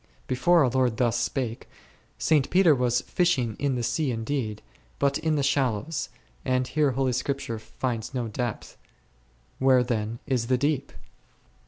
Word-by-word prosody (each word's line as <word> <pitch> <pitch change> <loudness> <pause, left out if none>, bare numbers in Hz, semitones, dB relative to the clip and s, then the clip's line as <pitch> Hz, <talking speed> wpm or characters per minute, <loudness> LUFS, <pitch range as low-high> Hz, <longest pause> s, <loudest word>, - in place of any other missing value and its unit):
Before 155 +6 +3
our 130 - +3
Lord 125 -3 +1
thus 120 -1 +1
spake, 125 -4 -3 0.5
St. 150 -4 +2
Peter 180 -4 +5
was 125 -2 +1
fishing 130 - 0
in 140 -2 0
the 120 - -2
sea 130 +5 0
indeed, 115 -2 -3 0.3
but 140 0 +1
in 160 -1 0
the 145 - +1
shallows, 135 0 0 0.3
and 130 0 +1
here 145 -2 +1
Holy 130 0 0
Scripture 125 -2 -2
finds 115 0 -4
no 125 -3 -2
depth; 120 +1 -4 0.8
where 130 -1 +5
then 115 -2 -2
is 125 -5 0
the 130 0 +2
deep 140 0 -1
130 Hz, 150 wpm, -26 LUFS, 120-140 Hz, 0.8 s, Peter